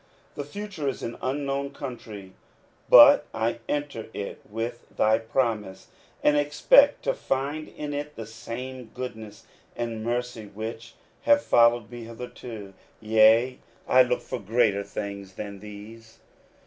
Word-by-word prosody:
The 145 - -5
future 185 0 -6
is 135 - -3
an 115 - -4
unknown 140 +1 -2
country, 105 -7 -8 0.6
but - - +9
I 115 +1 -1
enter 145 -6 -3
it 100 - -5
with 115 +2 -5
thy 110 +1 +4
promise, 110 -5 -2 0.3
and 150 - +4
expect 145 - +5
to - - +1
find 145 - -2
in 150 -1 -6
it 145 +1 -5
the 115 - -6
same 125 +3 -7
goodness 110 -4 -7 0.3
and 115 -2 -4
mercy 120 -2 -3
which 115 +2 -7 0.3
have 290 0 +5
followed 115 -2 +4
me 120 -1 -8
hitherto; 115 -3 -9 0.3
yea, 110 +3 +4 0.3
I 130 - +6
look 125 -1 +1
for 130 - -5
greater 105 -1 +2
things 100 -1 -6
than 100 0 -7
these. 110 +2 -12
115 Hz, 135 wpm, -26 LUFS, 110-135 Hz, 0.6 s, but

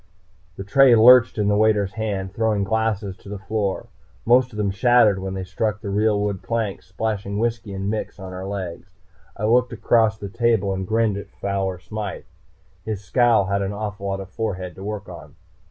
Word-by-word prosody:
The 95 - -6
tray 125 +5 +5
lurched 115 +1 +7
in 105 -1 +1
the 105 - +3
waiter's 105 -2 +2
hand, 100 -4 -3
throwing 110 -2 0
glasses 105 -2 -1
to - - -14
the 105 - -5
floor. 100 0 -2 0.4
Most 125 +2 +4
of 105 - -10
them 100 -2 0
shattered 105 0 +4
when 95 0 -5
they 95 - -4
struck 105 +3 -2
the 100 -2 -5
real 105 +1 +2
wood 100 -2 -2
planks, 115 -4 -3
splashing 100 +1 -3
whisky 115 -1 -2
and 95 0 -4
mix 110 +1 -3
on 95 -1 -8
our 95 +1 -6
legs. 95 -3 -6 0.5
I 105 - -2
looked 125 +3 +3
across 110 -2 +2
the 100 - -6
table 105 -2 +1
and 95 -1 -4
grinned 110 -1 +1
at 100 - -8
Fowler 95 -2 -3
Smythe. 105 +2 -6 0.6
His 105 -2 -4
scowl 115 0 +3
had 100 0 -1
an 100 +1 -2
awful 105 -1 -5
lot 95 0 -2
of 95 -1 -10
forehead 95 -5 -4
to 95 - -11
work 105 -1 -5
on. 80 -4 -11
105 Hz, 195 wpm, -22 LUFS, 95-110 Hz, 0.6 s, lurched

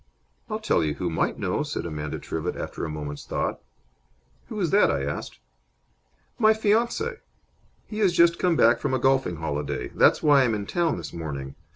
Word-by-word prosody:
"I'll - - -1
tell 85 - +1
you 75 -1 -1
who 90 -2 -2
might 80 - 0
know," - - -1
said - - -3
Amanda 75 -3 -4
Trivett, 80 +2 -4
after - - -5
a - - -4
moment's 75 -1 -6
thought. - - -3 0.9
"Who 220 -3 -5
is 175 -5 0
that?" 205 - +5
I 70 -1 0
asked. 70 +1 -5 1.0
"My 220 -1 +5
fiance. 235 - +1 0.7
He 215 - -6
has 200 -4 +4
just 170 0 +4
come 180 -2 +2
back 120 -4 +4
from 130 - -1
a - - 0
golfing 135 -8 +2
holiday. 75 -3 -3
That's - - +3
why 145 -2 +6
I'm 120 -4 +2
in 100 -1 -4
town 170 - 0
this - - -7
morning. 70 -5 -5
115 Hz, 185 wpm, -25 LUFS, -, 1.0 s, why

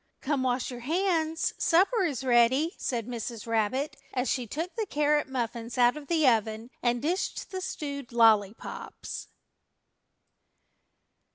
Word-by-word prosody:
"Come, 280 -1 0
wash 255 0 0
your 245 - -7
hands; 325 +2 0
supper 390 +7 +3
is 275 -6 -2
ready," 260 +6 +4
said 235 -4 -2
Mrs. 235 -2 -5
Rabbit, 230 +6 0 0.2
as 250 0 0
she 250 -3 -1
took 330 - -4
the 440 -2 -2
carrot 295 -3 +1
muffins 235 -2 -3
out 245 +1 +5
of 300 -2 -9
the 320 -4 +3
oven 225 0 +1
and 240 0 +1
dished 355 +7 -2
the 375 -1 -4
stewed 285 -8 -5
lollypops. 220 -3 +1
260 Hz, 130 wpm, -28 LUFS, 235-315 Hz, 0.2 s, out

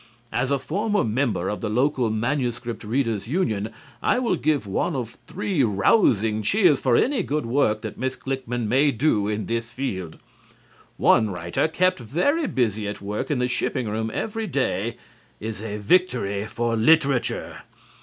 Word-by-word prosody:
As 125 +1 0
a 140 - +2
former 205 +9 0
member 110 -5 0
of 105 - -3
the 110 - -2
local 125 +1 +1
manuscript 120 0 -2
readers' 115 -2 -1
union, 115 - 0 0.3
I - - +2
will 250 -1 +1
give 150 -6 0
one 105 - -1
of 120 -4 -5
three 185 -6 0
rousing 110 - +3
cheers 165 - +3
for 125 -3 +3
any 270 - +2
good 150 -3 -2
work 115 -3 +1
that - - -6
Miss 130 +1 -1
Klickmann 125 -4 -3
may 135 +6 +4
do 115 -5 +1
in 105 0 -2
this 115 0 -3
field. 95 -11 -4 0.8
One 110 -2 +4
writer 90 - -1
kept 185 +2 +1
very 180 - 0
busy 110 - 0
at 105 - -5
work 105 +1 -4
in 145 - +1
the 125 0 +1
shipping 125 -1 -1
room 110 +1 -2
every 225 - -3
day 125 - -1 0.4
is 110 -1 -5
a 105 -2 -4
victory 105 - +1
for 115 +1 -1
literature. 140 +1 +2
120 Hz, 160 wpm, -24 LUFS, 110-145 Hz, 0.8 s, may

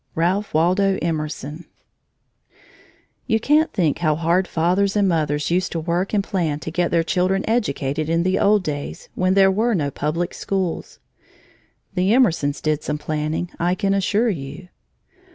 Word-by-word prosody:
RALPH 185 +5 0
WALDO 190 +4 +3
EMERSON 155 -1 -4 1.6
You 225 - +2
can't 300 +6 +3
think 160 -6 0
how 155 -3 +2
hard 170 +4 +1
fathers 185 +5 +1
and 205 -1 +3
mothers 150 -3 0
used 180 +1 +1
to 165 - -1
work 175 +4 -1
and 205 -2 +1
plan 170 -8 -1
to 160 - -5
get 175 +1 0
their 170 -1 +2
children 185 +3 0
educated 155 - -1
in 165 +1 +2
the 185 +1 +1
old 205 -1 +3
days 145 -3 -5
when 185 +1 +1
there 195 -1 +5
were 220 +4 +1
no 145 -5 -1
public 165 +6 -2
schools. 190 -4 -3 1.0
The 190 +4 +2
Emersons 160 - +2
did 155 -1 0
some 150 - -3
planning, 155 +3 -3
I 175 +2 +1
can 195 0 0
assure 210 +4 +1
you. 165 +2 -7
175 Hz, 155 wpm, -21 LUFS, 155-195 Hz, 1.6 s, there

